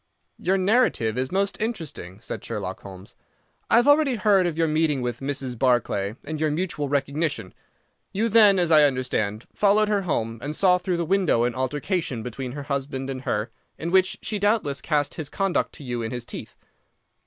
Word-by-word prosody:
"Your 190 +2 +1
narrative 185 - +2
is 130 +1 -2
most 195 +2 -1
interesting," 160 - -4
said - - -6
Sherlock 95 -2 -4
Holmes. 95 0 -11 0.6
"I - - +5
have 240 +3 +5
already 290 -3 +5
heard 195 -3 +3
of 165 -2 -3
your 165 -1 +2
meeting 155 -4 +1
with 120 -1 -3
Mrs. 135 -3 -4
Barclay, 115 -5 +1
and 155 +1 -5
your 155 - +2
mutual 150 -2 -2
recognition. 140 - -1 0.6
You 220 +4 0
then, 210 -3 +6
as 175 -2 +1
I 155 -1 +7
understand, 125 -6 0
followed 210 +1 +3
her 205 -2 +2
home 115 - -2
and 150 +3 -4
saw 180 0 +4
through 180 0 -1
the 170 - -1
window 185 -9 +2
an 120 0 0
altercation 130 - -2
between 125 +1 -5
her 145 0 -6
husband 135 -1 -3
and 130 -1 -5
her, 105 +3 -1 0.3
in 170 +1 -4
which 190 0 +3
she 210 - -2
doubtless 205 -9 +1
cast 145 -2 0
his 155 -3 -6
conduct 195 +1 0
to 150 - -10
you 120 -2 -3
in 115 - -3
his 120 0 -5
teeth. - - -8
150 Hz, 190 wpm, -24 LUFS, 125-190 Hz, 0.6 s, I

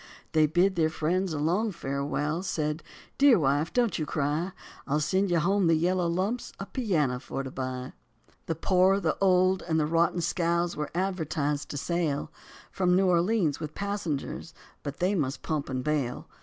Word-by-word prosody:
They 155 -1 +4
bid 180 +5 +2
their 160 -1 +3
friends 175 +4 0
a 155 - -2
long 180 +9 +1
farewell, 145 0 -2
said, 155 -4 -2 0.4
"Dear 275 -4 +7
wife, 145 0 +1
don't 235 -8 +1
you 155 - -2
cry, 150 +5 -1 0.4
I'll 150 +2 +1
send 190 +6 +1
you 175 - +2
home 190 +3 +2
the 165 - +5
yellow 175 +2 +1
lumps 190 +8 -2
a 195 - -4
piano 160 - 0
for 135 +1 -5
to 130 - -6
buy." 130 0 -4 0.5
The 165 - -1
poor, 185 +4 +3
the 165 -5 0
old, 185 0 +4
and 160 -2 0
the 150 - +2
rotten 170 +2 +2
scows 170 0 0
were 150 - -3
advertised 160 -6 -1
to 145 - -4
sail 160 -2 -1 0.4
From 180 -1 +2
New 190 +1 +4
Orleans 175 -3 +2
with 155 -2 -6
passengers, 200 -8 -3 0.3
but 140 0 -6
they 185 +3 +1
must 145 -7 -2
pump 150 -3 -2
and 130 -1 -2
bail. 145 -4 -1
165 Hz, 175 wpm, -28 LUFS, 150-185 Hz, 0.5 s, Dear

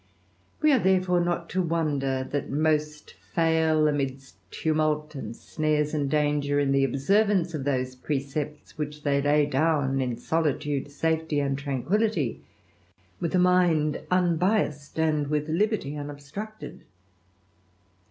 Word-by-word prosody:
We 305 - +6
are, 260 - +4
therefore, 185 -2 +2
not 175 -1 -1
to 185 - +1
wonder 145 -6 -1
that 145 0 -2
most 150 +1 -1 0.2
fail, 160 -2 +3
ami 140 -3 0 0.3
tumult, 155 +1 0
and 115 -5 -6
snares, 150 +1 -1
and 145 -3 0
danger, 145 -1 +1
in 140 -1 +1
the 135 0 +3
observance 180 - +2
of 145 -4 -4
thi 130 -3 +1 0.2
precepts, 145 +2 -4
which 150 0 -5
they 140 -1 +2
lay 145 +1 +3
down 145 -2 +1
in 125 -3 -2
solitude, 145 0 -1
safety, 160 +1 0
a 140 -1 0
tranquillity, 145 - -1 0.8
with 170 +1 -1
a - - +4
mind 175 -4 +3
unbiassed, 175 -4 +1
and 155 -2 +1
with 150 0 -1
libe 210 +7 +1
unobstructed. 145 +10 -8
150 Hz, 125 wpm, -26 LUFS, 140-165 Hz, 0.8 s, We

